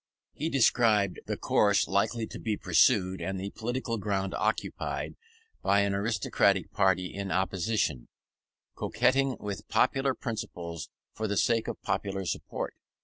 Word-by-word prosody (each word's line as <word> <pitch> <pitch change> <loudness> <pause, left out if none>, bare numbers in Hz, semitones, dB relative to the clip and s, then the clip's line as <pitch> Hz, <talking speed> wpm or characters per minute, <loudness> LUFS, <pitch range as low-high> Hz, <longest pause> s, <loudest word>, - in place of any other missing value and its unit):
He 155 +3 -2
described 115 - +3
the - - -2
course 100 -1 +3
likely 110 +4 +1
to - - -9
be 110 -3 -1
pursued, 95 +2 +3
and 95 0 -3
the 100 +1 -4
political 120 0 -3
ground 95 -1 -1
occupied, - - -2 0.5
by 100 +1 +3
an 100 0 +1
aristocratic 100 0 +1
party 90 -1 +2
in 100 -1 -4
opposition, 95 - 0 0.7
coquetting 130 +1 +1
with 100 -1 -5
popular 135 -1 +2
principles 85 - -5 0.2
for 110 0 -3
the 100 -1 -1
sake 115 +1 +2
of - - -4
popular 95 -1 -2
support. 80 - -3
100 Hz, 135 wpm, -29 LUFS, 95-115 Hz, 0.7 s, described